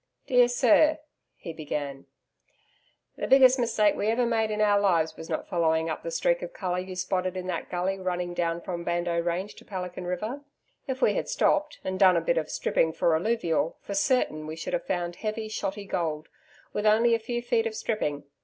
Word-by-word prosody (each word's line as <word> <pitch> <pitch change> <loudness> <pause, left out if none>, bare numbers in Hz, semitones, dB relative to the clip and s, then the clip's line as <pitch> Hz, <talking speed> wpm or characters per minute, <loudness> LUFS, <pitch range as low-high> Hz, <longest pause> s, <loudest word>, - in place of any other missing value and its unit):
Dear 250 -1 +5
Sir 260 +5 +4 0.4
he 165 - -8
began: 145 -3 -5 1.1
The - - -3
biggest 260 -1 +6
mistake 220 -3 +3
we 205 - -1
ever 235 +2 +2
made 225 -2 +1
in 210 0 -2
our 205 -1 +4
lives 170 -5 +2
was 160 - -10
not - - -3
following 160 -1 +1
up - - -4
the - - -5
streak - - +1
of - - -6
colour 180 -2 -2
you 185 0 -6
spotted 185 0 -1
in 185 - -4
that 185 - -4
gully 190 +2 -1
running 180 -1 -2
down 170 -1 -1
from 170 -1 -5
Bardo 175 0 0
Range 175 +4 -2
to - - -15
Pelican 180 -2 -6
River. 215 +10 -3 0.5
If 265 0 -3
we - - +4
had - - -2
stopped, 305 -11 +1
and 190 0 -3
done 185 -3 +6
a - - +4
bit 165 0 +1
of 155 - -5
stripping 160 0 +1
for 165 0 +2
alluvial, 170 -4 0
for 200 - -7
certain, 200 - +1
we 155 - -5
should 165 - -6
have - - -2
found 175 0 -2
heavy, 215 0 -3
shotty 200 -1 -4
gold, 160 -4 -2 0.4
with 210 +1 0
only 230 +2 +4
a 230 - +2
few 240 +1 -4
feet 235 -2 +1
of 220 - -5
stripping. 150 -11 -2
190 Hz, 200 wpm, -27 LUFS, 170-230 Hz, 1.1 s, biggest